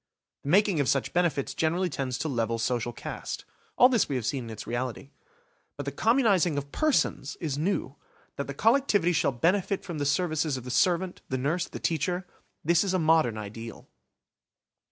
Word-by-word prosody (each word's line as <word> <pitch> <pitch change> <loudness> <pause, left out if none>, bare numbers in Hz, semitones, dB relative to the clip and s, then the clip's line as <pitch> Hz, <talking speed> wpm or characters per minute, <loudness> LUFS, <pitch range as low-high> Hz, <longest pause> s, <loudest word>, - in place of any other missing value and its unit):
The 140 - -6
making 195 -1 +4
of 140 - +1
such 135 - 0
benefits 170 -6 +1
generally 170 +4 +1
tends 130 -5 -3
to 160 - -2
level 115 -4 -1
social 120 +1 -1
caste. - - -6 0.3
All 250 - +8
this 245 -5 +2
we 140 - -1
have 125 -4 -2
seen 130 -1 -2
in - - -8
its 110 -1 -7
reality. 125 +3 -4 0.7
But - - -5
the - - -2
communising 205 - +3
of 140 0 -4
persons 275 - 0
is 155 -5 -2
new. 155 -5 -1 0.4
That 140 - -4
the 140 - -6
collectivity 220 - +3
shall 145 - +2
benefit 185 - +1
from 170 -4 -5
the 145 - 0
services 155 -2 0
of 130 - -7
the 125 - -6
servant, 175 +6 +1
the 130 - -1
nurse, 155 +7 -1
the - - -8
teacher–this 175 0 -1
is 190 -2 0
a - - +4
modern 160 -9 +3
ideal. 110 +2 -8
155 Hz, 180 wpm, -28 LUFS, 130-180 Hz, 0.7 s, All